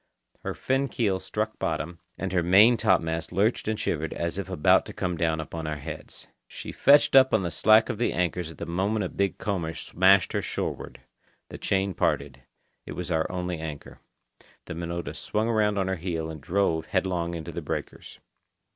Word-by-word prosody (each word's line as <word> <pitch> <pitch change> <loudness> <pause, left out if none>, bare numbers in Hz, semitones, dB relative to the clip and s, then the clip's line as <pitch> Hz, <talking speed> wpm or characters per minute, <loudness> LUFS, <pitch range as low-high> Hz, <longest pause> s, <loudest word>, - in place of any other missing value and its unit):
Her - - -5
fin 135 +1 0
keel 100 -6 0
struck - - -3
bottom, 85 +4 -3 0.2
and 95 -1 -3
her 90 - +3
main 100 +8 +6
topmast 80 -5 +1
lurched 105 +7 +1
and 110 0 -1
shivered 80 -5 -2
as 85 +2 -3
if 95 - -5
about 90 -6 +4
to - - -8
come 90 -1 -2
down 80 -1 0
upon 80 +1 -5
our 75 -1 -3
heads. 75 +2 -9 0.2
She - - -8
fetched 145 0 +5
up 130 -3 +7
on 105 - +1
the 85 - -2
slack 110 +4 +5
of 120 -4 -4
the - - +1
anchors 90 -1 -1
at 80 - -12
the - - -5
moment 95 +4 -1
a - - -3
big 100 0 -1
comber 90 -7 -2
smashed 95 +1 +3
her - - 0
shoreward. - - -4 0.5
The - - -9
chain 95 0 0
parted. 70 -5 -1 0.5
It - - -5
was 90 -1 -5
our 80 -1 0
only 90 -2 -3
anchor. 80 -3 -7 0.7
The - - -6
Minota 85 +1 -4
swung 110 +2 -1
around 105 -3 +2
on 95 -1 0
her 95 0 -1
heel 80 -2 -3
and 80 -2 -9
drove 85 -1 0
headlong 90 -3 -1
into 85 0 -6
the - - -5
breakers. - - -6
90 Hz, 190 wpm, -26 LUFS, 80-100 Hz, 0.7 s, up